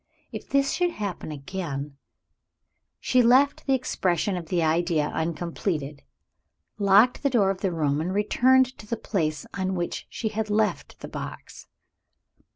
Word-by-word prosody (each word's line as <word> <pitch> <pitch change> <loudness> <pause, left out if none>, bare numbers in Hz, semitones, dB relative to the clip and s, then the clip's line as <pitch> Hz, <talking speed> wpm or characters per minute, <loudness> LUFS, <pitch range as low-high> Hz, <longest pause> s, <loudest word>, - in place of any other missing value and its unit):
If - - -8
this 275 0 +2
should 355 -1 +1
happen 200 - -5
again 145 -2 -5 0.5
" - - -56 0.3
She 255 - +3
left 260 +5 +4
the 270 - +4
expression 190 -7 0
of 170 -2 -5
the 170 0 0
idea 160 -1 +1
uncompleted; 160 -3 -3 0.8
locked 205 +5 +5
the 280 - +2
door 210 -7 +3
of 190 - -6
the 190 - 0
room; 150 -3 0
and 175 +3 -2
returned 255 +6 +3
to 210 - -11
the 230 - -2
place 155 -9 -2
on 190 -1 -2
which 175 -1 -4
she 220 - -3
had 215 0 -3
left 210 0 -1
the - - -6
box. - - -8
190 Hz, 155 wpm, -25 LUFS, 160-230 Hz, 0.8 s, locked